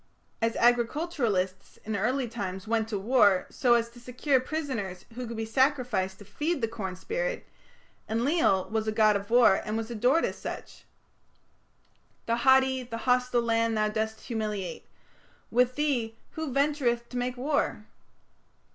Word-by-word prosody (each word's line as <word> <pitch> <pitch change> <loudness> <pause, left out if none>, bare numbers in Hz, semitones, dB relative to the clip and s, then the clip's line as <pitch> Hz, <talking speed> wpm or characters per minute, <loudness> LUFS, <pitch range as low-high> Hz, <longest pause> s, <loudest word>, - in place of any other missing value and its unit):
As 225 0 +1
agriculturists 235 - 0
in 220 0 -2
early 245 +6 0
times 195 -4 -5
went 225 -1 +1
to 210 - -1
war 205 -3 +4
so 245 -2 +3
as 230 -1 +1
to 240 - -14
secure 255 +3 +1
prisoners 255 - -4
who 245 +1 -5
could 230 0 -6
be 225 - -2
sacrificed 240 -6 +1
to 205 - -13
feed 300 - -2
the 230 - 0
corn 195 -5 -5
spirit, - - -3 0.6
Enlil 230 - +2
was 220 0 -1
a - - +1
god 215 -1 +4
of 200 +1 -3
war 235 -4 +5
and 215 +1 -2
was 225 +1 -4
adored 245 +8 +2
as - - -4
such: - - -8 1.4
The 230 0 +1
haughty, 265 +1 +4
the 235 -2 -6
hostile 250 -1 +2
land 230 -1 +1
thou 215 0 +2
dost 220 +1 -3
humiliate... 210 -5 -4 0.6
With 250 +1 +3
thee 255 -7 0 0.2
who 315 -3 -4
ventureth 270 -4 +1
to 250 - -5
make 245 0 -2
war? 285 +3 -1
235 Hz, 155 wpm, -28 LUFS, 215-260 Hz, 1.4 s, war